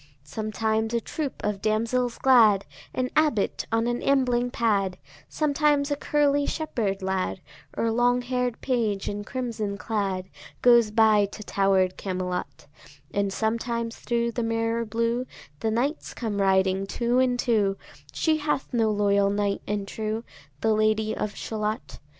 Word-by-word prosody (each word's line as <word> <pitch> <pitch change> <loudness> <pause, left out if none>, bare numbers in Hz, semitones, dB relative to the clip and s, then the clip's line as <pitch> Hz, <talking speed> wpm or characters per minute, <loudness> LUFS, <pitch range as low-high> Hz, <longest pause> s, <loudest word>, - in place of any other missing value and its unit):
Sometimes 220 +5 -1
a - - +3
troop 285 +4 -5
of 205 -2 -2
damsels 230 +3 0
glad, 225 -7 +5 0.3
An 255 0 -2
abbot 300 -10 +1
on 225 0 +2
an 240 0 -1
ambling 250 -3 +2
pad, 200 -6 0 0.3
Sometimes 295 -1 +1
a - - +2
curly 285 0 +1
shepherd 210 -11 -2
lad, 190 0 -1 0.4
Or 230 - +1
long 245 +2 +2
hair'd 250 -1 -2
page 225 -7 0
in 205 0 -3
crimson 220 -4 -3
clad, 195 -4 -2 0.4
Goes 235 -3 +6
by 215 -1 +4
to 215 +2 -9
tower'd 195 -2 +2
Camelot; 180 -1 -4 0.5
And 200 -1 0
sometimes 230 +2 -2
thro' 235 -1 -1
the 235 - -3
mirror 230 0 0
blue 230 +3 -1 0.3
The 220 - 0
knights 260 +8 -1
come 210 -4 -2
riding 190 0 +2
two 240 +4 +1
and 255 -1 +2
two: 210 -5 +1 0.3
She 315 -1 +1
hath 295 -3 -2
no 225 -2 +2
loyal 200 -1 +2
knight 200 0 0
and 205 -1 -2
true, 220 +2 -3 0.4
The 220 - +3
Lady 215 0 +1
of 210 - -3
Shalott. 215 +1 -4
225 Hz, 145 wpm, -26 LUFS, 205-245 Hz, 0.5 s, Goes